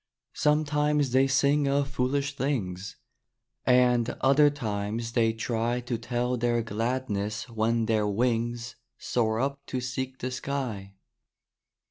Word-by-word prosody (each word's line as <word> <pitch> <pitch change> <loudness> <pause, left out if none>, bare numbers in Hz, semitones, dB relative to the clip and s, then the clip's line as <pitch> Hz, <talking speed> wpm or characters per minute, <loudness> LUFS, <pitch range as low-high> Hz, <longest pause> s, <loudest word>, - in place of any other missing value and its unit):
Sometimes 150 -2 +2
they 130 +2 +4
sing 140 +2 +3
of 140 0 +1
foolish 140 +1 -1
things, 100 -9 -2 0.7
And 125 -2 +4
other 140 +2 +5
times 115 -4 -3
they 115 -2 +3
try 115 +1 -1
To 120 0 -3
tell 125 +1 -1
their 120 0 +1
gladness 110 -1 -2
when 115 0 0
their 110 -2 +1
wings 120 +2 -1 0.2
Soar 110 -2 0
up 140 +2 -1
to 130 - -2
seek 130 +1 -4
the 130 0 -4
sky. 125 -8 -4
125 Hz, 120 wpm, -27 LUFS, 115-135 Hz, 0.7 s, other